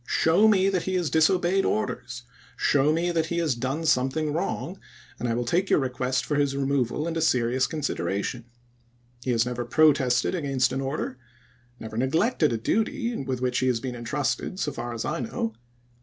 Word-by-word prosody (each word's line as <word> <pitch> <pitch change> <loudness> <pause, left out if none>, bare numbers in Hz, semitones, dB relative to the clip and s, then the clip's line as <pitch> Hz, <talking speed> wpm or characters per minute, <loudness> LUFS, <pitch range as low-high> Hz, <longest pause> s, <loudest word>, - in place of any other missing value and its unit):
Show 170 +7 +4
me 195 -3 +4
that 190 -3 0
he 190 - -1
has 175 -4 0
disobeyed 180 +3 +3
orders; 125 -13 -2 0.3
show 145 +1 +3
me 170 +2 +1
that 165 -1 0
he 170 - -2
has 165 -5 +1
done 130 +7 -3
some 130 -4 +3
thing 155 +1 -2
wrong, 180 +2 -3 0.4
and 120 - -2
I 115 - 0
will 120 0 -1
take 180 +9 +1
your - - +5
request 130 -1 -1
for 145 - -1
his 140 -1 +1
removal 140 +1 0
into 165 -1 -2
serious 130 -4 +2
consideration. 120 - -3 0.8
He - - -3
has 115 -1 +2
never 125 0 -3
protested 135 -1 +3
against 135 -7 +1
an 135 - -1
order 135 -1 -3 0.3
— 120 0 -34
never 110 0 -7
neglected 155 - +2
a 115 - 0
duty 230 - -1
with 130 - -3
which 125 -1 0
he 130 - +1
has 125 -3 +1
been 130 +1 -4
intrusted, 135 +9 -2
so 150 - -1
far 120 -3 -5
as 115 - -4
I - - -2
know. 115 -2 -3
135 Hz, 190 wpm, -26 LUFS, 125-165 Hz, 0.8 s, your